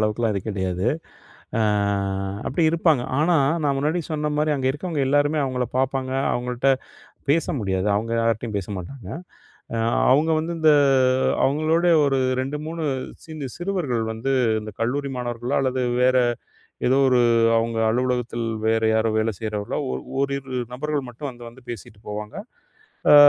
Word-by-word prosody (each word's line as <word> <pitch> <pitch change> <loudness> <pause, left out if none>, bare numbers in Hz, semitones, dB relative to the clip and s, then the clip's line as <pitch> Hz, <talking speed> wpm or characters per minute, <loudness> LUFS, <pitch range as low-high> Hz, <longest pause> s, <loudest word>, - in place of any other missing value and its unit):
அளவுக்குலாம் 110 +1 +1
இது 100 - -1
கிடையாது. 95 -1 -2 0.7
அ - - +3 0.8
அப்படி 165 +5 0
இருப்பாங்க. 160 -6 +3 0.2
ஆனா 165 +3 +3 0.3
நான் 140 -2 +2
முன்னாடி 155 +5 0
சொன்ன 150 -1 -1
மாரி 150 0 +2
அங்கே 130 -1 0
இருக்கவங்க 150 0 -3
எல்லாருமே 145 +2 +2
அவங்களை 125 -2 -1
பாப்பாங்க. 130 0 0 0.2
அவங்கள்ட்ட 125 +2 0 0.6
பேச 165 +2 +2
முடியாது. 95 -1 -1
அவங்க 115 +2 -2
யார்ட்டயும் 115 -1 0
பேச 100 - -4
மாட்டாங்க. 100 +4 -8 0.7
அ - - -1 0.4
அவங்க 155 +4 +3
வந்து 170 +2 -3
இந்த 155 -1 +6 0.7
அவங்களோட 155 +5 +2 0.2
ஒரு 135 -1 +2 0.2
2 140 +3 -3
3 165 0 -4 0.4
சின்ன 155 -4 -6
சிறுவர்கள் 175 -11 -1
வந்து, 120 +5 -2 0.3
இந்த 110 0 -7
கல்லூரி 140 +4 -1
மாணவர்களோ 120 +2 -2
அல்லது 130 -1 0 0.2
வேற 130 0 +4 0.7
ஏதோ 130 +2 +4
ஒரு, 125 -1 +4 0.4
அவங்க 115 0 0
அலுவலகத்தில் 120 -1 -1 0.2
வேறு 110 0 +2
யாரோ 110 0 +2
வேலை 110 +1 +1
செய்றவர்களோ, 105 -2 -3
ஒ - - -1 0.3
ஓரிரு 140 -1 -2 0.2
நபர்கள் 145 +1 -2
மட்டும் 130 +4 -6
வந்து 120 -1 -12
வந்து 125 +2 -15
பேசிட்டு 105 -2 -8
போவாங்க. 105 0 -5 0.8
அ - - +10
130 Hz, 145 wpm, -23 LUFS, 115-145 Hz, 0.8 s, அ